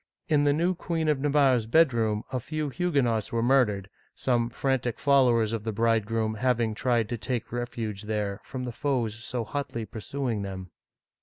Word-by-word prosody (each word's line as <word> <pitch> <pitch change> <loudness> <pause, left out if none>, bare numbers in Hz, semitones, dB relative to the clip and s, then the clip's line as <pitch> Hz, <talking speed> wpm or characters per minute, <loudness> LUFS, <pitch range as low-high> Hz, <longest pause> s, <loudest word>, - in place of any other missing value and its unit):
" - - -55
In 145 0 +3
the 145 - +5
new 170 +5 +2
Queen 165 -2 -2
of 150 -3 +2
Navarre's 135 -5 +3
bedroom 115 -7 +3
a 130 - -1
few 155 +4 -3
Huguenots 135 - 0
were 115 0 0
murdered, 120 -7 +3 0.3
some 120 -2 +1
frantic 125 -1 -1
followers 125 -6 +3
of 110 -2 -3
the 110 - -2
bridegroom 115 0 +1
having 115 -1 +1
tried 120 -1 +1
to 120 - -3
take 120 +2 -3
refuge 115 -4 -4
there 105 -2 -3
from 130 -1 -6
the 125 - -3
foes 120 -4 -2
so 125 -1 -3
hotly 120 -1 -4
pursuing 115 0 -3
them. 95 -2 -6
120 Hz, 170 wpm, -27 LUFS, 110-135 Hz, 0.3 s, the